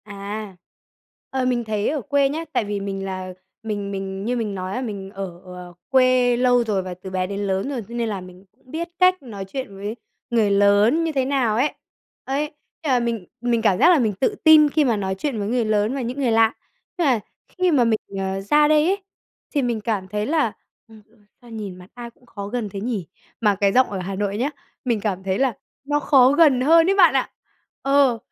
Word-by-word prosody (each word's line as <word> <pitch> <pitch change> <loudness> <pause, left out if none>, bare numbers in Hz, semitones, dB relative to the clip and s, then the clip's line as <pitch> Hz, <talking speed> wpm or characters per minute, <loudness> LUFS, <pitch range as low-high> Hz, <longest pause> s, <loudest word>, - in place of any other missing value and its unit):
À, 205 0 -7 0.7
ờ, 265 -1 -1
mình 245 -1 0
thấy 215 -1 -1
ở 295 -1 -2
quê 280 +1 +2
nhá, 320 +4 -4
tại - - +1
vì 205 0 -3
mình 195 -1 -4
là 185 -1 -5 0.3
mình 205 -2 -4
mình 195 0 -5
như 245 +2 0
mình 215 -4 -3
nói 185 0 -4
á, 255 - -2
mình 200 -6 -5
ở, 190 -3 -7
à, 180 0 -8 0.2
quê 255 -2 +4
lâu 245 -1 +3
rồi, 210 -4 0
và 185 -1 -6
từ 185 +2 -10
bé 185 -1 -1
đến 200 +1 -4
lớn 195 +4 -1
rồi, 265 -4 -3
cho 235 - -7
nên 235 -1 -1
là 200 -3 -4
mình 180 +1 -13 0.2
biết 320 +6 -4
cách 370 0 +4
nói 205 -6 -7
chuyện 200 0 -6
với 205 +3 -5 0.3
người 225 -4 +2
lớn 205 +9 +4
như 325 - -1
thế 270 -3 0
nào 260 -5 +1
ấy. 260 +6 +1 0.5
Ấy, 290 +3 -2 0.3
thế - - -4
là 250 - +4
mình 230 -5 -2 0.2
mình 240 -1 +1
cảm 205 -5 +3
giác 345 - +6
là 345 -4 +5
mình 220 -4 +1
tự 265 - 0
tin 310 -2 +7
khi 300 0 +2
mà 235 -4 +1
nói 190 -1 -2
chuyện 235 +3 -3
với 200 - -2
người 240 +1 0
lớn 215 +3 +1
và 275 - -2
những 250 +3 -4
người 250 -4 +2
lạ. 225 0 +4 0.4
Nhưng 340 -4 +2
mà 250 -4 +3 0.3
khi 365 -1 0
mà 275 -6 +4
mình, 225 -2 +2 0.2
ờ, 190 0 -2
ra 295 +9 +4
đây 305 0 +4
ấy, 390 +2 0 0.5
thì 290 - +2
mình 240 -4 -1
cảm 205 -4 -2
thấy 210 +2 -2
là, 290 -6 +1 0.3
ừm 220 -1 -16 0.4
"Sao 240 - -16
nhìn 210 -5 -6
mặt 180 0 -14
ai 240 -1 -8
cũng 245 +1 -27
khó 200 -4 -7
gần 225 -1 -3
thế 195 - -6
nhỉ?" 215 -7 -3 0.3
Mà 210 -3 +3
cái 200 0 +2
giọng 255 0 +5
ở 195 - -4
Hà 190 +2 -4
Nội 200 0 -2
nhá, 255 +6 0 0.4
mình 235 -4 +1
cảm 190 -3 -2
thấy 190 0 -1
là 260 -5 +1 0.3
nó 290 +1 0
khó 265 -4 +5
gần 285 -4 +5
hơn 325 +5 +6
đấy 390 - +3
bạn 355 -6 +6
ạ. 265 -2 0 0.5
Ờ, 275 -3 +3
230 Hz, 230 wpm, -22 LUFS, 200-265 Hz, 0.7 s, tin